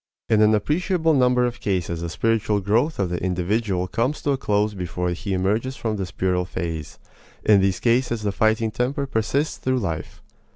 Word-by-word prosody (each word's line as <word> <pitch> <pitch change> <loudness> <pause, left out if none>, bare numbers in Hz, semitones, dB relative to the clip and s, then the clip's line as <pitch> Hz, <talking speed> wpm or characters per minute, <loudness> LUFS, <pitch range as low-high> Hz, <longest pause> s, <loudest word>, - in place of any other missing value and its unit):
In 110 -1 +4
an 110 0 +5
appreciable 160 - +1
number 125 -2 +3
of 120 -1 -3
cases 85 -4 -2
the 85 - -3
spiritual 110 +3 +1
growth 115 +11 +1
of 95 -3 -1
the 85 - -3
individual 95 +1 0
comes 125 +9 -1
to 145 - +1
a - - +2
close 105 -3 0
before 90 -1 -3
he 90 +3 -4
emerges 105 +8 0
from 110 -4 -2
this 95 -3 -3
puerile 90 0 0
phase; 80 -4 -5 0.5
in 105 -2 +6
these 95 -1 +1
cases 120 -2 +1
the 100 - 0
fighting 110 +2 +1
temper 130 +5 -1
persists 135 +5 -1
through 130 0 0
life. 85 -9 -4
105 Hz, 180 wpm, -23 LUFS, 90-125 Hz, 0.5 s, in